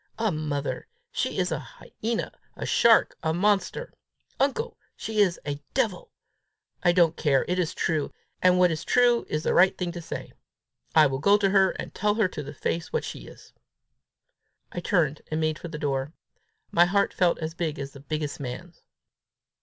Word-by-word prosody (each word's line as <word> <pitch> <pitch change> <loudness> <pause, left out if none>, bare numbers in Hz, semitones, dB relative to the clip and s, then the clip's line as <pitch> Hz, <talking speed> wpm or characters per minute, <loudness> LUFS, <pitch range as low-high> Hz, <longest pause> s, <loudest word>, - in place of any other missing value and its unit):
A 220 -2 +1
mother! 150 -3 -3 0.2
She - - -2
is - - 0
a - - -1
hyena, 230 +1 -5 0.2
a - - -5
shark, 230 -1 +4
a 160 0 0
monster! 205 - 0 0.5
Uncle, 285 - 0 0.2
she 220 -1 -3
is 190 -4 +3
a 145 0 -4
devil! - - -1 0.7
I 175 - +4
don't 170 -2 +4
care! 140 -4 +2
It 180 +1 0
is 175 -1 -1
true; 155 -3 0 0.3
and 180 0 +5
what 180 -1 +5
is 160 0 -3
true 245 -1 +3
is 155 +1 -1
the - - +1
right 185 +2 +5
thing 180 -2 -2
to 170 0 -7
say. 165 - -7 0.6
I 155 -1 +8
will 135 -1 0
go 200 +7 +5
to 195 -2 +1
her, 190 -1 +5
and - - -6
tell 210 +1 +1
her 215 -3 +3
to 150 - -6
her 145 - -7
face 165 +4 -2
what - - -1
she - - -7
is!" - - -15 1.2
I - - -4
turned 165 -6 +1
and 155 - -1
made 155 0 0
for - - -7
the 160 -2 -6
door. 140 0 -2 0.6
My 170 +1 +6
heart 200 +3 +1
felt 175 -2 +2
as 160 0 -4
big 165 -2 -3
as 140 0 -5
the 140 - -12
biggest 150 +2 -4
man's. 145 +6 -7
170 Hz, 185 wpm, -26 LUFS, 150-195 Hz, 1.2 s, I